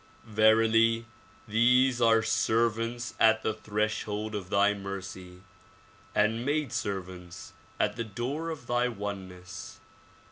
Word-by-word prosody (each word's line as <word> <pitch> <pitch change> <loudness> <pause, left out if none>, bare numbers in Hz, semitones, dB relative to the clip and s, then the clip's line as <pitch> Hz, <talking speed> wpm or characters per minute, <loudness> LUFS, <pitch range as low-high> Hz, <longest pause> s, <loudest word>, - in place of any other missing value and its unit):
Verily 115 +1 +4 0.4
these 125 +3 +3
are 115 -1 +5
servants 115 +2 0
at 110 0 +4
the 110 - 0
threshold 105 0 -2
of 100 -3 -5
thy 100 +1 +3
mercy, 95 -2 -8 0.7
and 110 +3 +2
maid 145 -1 -1
servants 90 -3 -5 0.3
at - - 0
the 115 - -1
door 125 +10 -4
of 155 -6 -6
thy 120 +1 +1
oneness. 95 -5 -7
110 Hz, 110 wpm, -29 LUFS, 100-115 Hz, 0.7 s, are